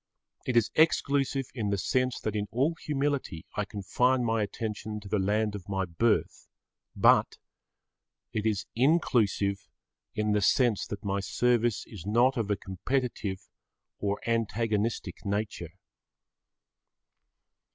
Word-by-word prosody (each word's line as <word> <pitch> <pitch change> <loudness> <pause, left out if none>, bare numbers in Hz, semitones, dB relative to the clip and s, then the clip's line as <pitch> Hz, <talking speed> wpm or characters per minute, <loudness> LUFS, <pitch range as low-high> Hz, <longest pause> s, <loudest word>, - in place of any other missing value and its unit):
It 125 -2 +2
is 115 - +3
exclusive 140 -3 +2
in 110 -5 -2
the 100 - +1
sense 125 +6 0
that 110 -1 -2
in 105 -1 -1
all 135 +8 +1
humility 140 - -2
I 105 - 0
confine 125 +6 +1
my 115 -1 +1
attention 105 0 -4
to 105 - -11
the 105 +1 0
land 105 +2 +1
of 100 -2 -8
my 95 -1 0
birth, 105 +7 0 0.5
but - - +4 1.0
it 110 - -1
is 105 -3 0
inclusive 115 - +2 0.5
in 105 0 0
the 105 0 +2
sense 120 +1 +3
that 105 - -6
my 100 0 0
service 120 +2 +1
is 100 -7 -10
not 120 +7 +3
of 115 -4 -2
a 105 - +1
competitive 100 0 -3 0.5
or 100 0 -1
antagonistic 115 -1 -1
nature. 100 -5 -3
110 Hz, 130 wpm, -29 LUFS, 100-125 Hz, 1.0 s, but